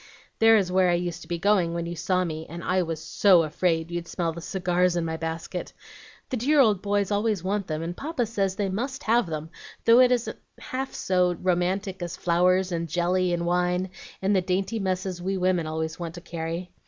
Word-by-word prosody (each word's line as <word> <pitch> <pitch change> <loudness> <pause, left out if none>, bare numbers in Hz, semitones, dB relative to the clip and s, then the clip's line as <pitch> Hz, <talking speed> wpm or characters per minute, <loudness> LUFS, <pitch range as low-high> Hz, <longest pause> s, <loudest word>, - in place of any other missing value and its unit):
"There 225 0 +7
is 190 -3 0
where 185 0 +4
I 175 - +3
used 175 -1 -3
to - - -11
be 170 0 -2
going 180 -2 +2
when 170 0 -2
you 170 +1 -5
saw 185 +2 0
me, 160 -2 -5
and 170 +1 -7
I 185 0 +1
was 165 -3 -3
SO 180 +1 +4
afraid 165 +1 0
you'd 170 0 -4
smell 170 -2 -2
the 170 - -8
cigars 180 0 +1
in 170 -1 0
my 160 0 -2
basket. 165 +2 -5 0.6
The 255 - 0
dear 285 +6 +3
old 215 -8 +4
boys 205 -1 0
always 205 -3 0
want 200 0 -1
them, 155 0 -3
and 170 +1 -4
Papa 280 - -2
says 195 -4 -1
they 200 0 -1
MUST 260 +9 -3
have 230 -1 +2
them, 155 0 -5 0.3
though 230 +2 +7
it 255 -1 +6
isn't 245 -1 -1 0.2
half 265 +1 -5
so 180 -1 +2
romantic 185 +2 -1
as 175 +1 -4
flowers, 180 +2 +2
and 170 -1 -2
jelly, 180 +2 +1
and 170 0 -1
wine, 180 +1 0 0.3
and 200 +1 +3
the 190 - +3
dainty 190 +5 -1
messes 185 -2 -2
we 190 +2 -1
women 180 -3 +1
always 160 +1 -3
want 170 -1 -5
to 175 - -8
carry. 170 +1 -5
180 Hz, 215 wpm, -26 LUFS, 170-195 Hz, 0.6 s, There